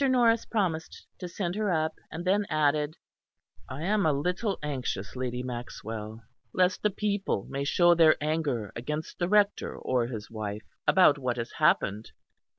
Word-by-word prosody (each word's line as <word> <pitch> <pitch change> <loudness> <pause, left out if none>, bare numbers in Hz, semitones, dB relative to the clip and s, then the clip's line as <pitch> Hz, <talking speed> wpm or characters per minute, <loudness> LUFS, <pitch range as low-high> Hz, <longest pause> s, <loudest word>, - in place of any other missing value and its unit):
Norris 235 -3 +4
promised 175 -8 -2
to 180 - -5
send 175 0 -3
her 210 +1 -1
up, 160 -1 +1 0.2
and 170 +2 -6
then 200 +2 +2
added: 150 0 +1 0.7
"I 135 +4 -5
am 205 +3 +2
a - - +4
little 180 +8 -1
anxious, 130 -8 -3
Lady 125 -1 -3
Maxwell, 115 -3 -6 0.3
lest 185 0 +2
the 210 - +3
people 200 - -1
may 140 +1 -3
show 175 +4 +5
their 165 -2 +6
anger 145 -8 -1
against 150 +6 -5
the 175 0 0
Rector 205 0 +2
or 125 -2 0
his 110 -3 -6
wife, 105 -1 -5 0.2
about 180 -6 +6
what 125 -2 -1
has 115 0 -4
happened." 105 +3 +1
155 Hz, 155 wpm, -28 LUFS, 125-185 Hz, 0.7 s, their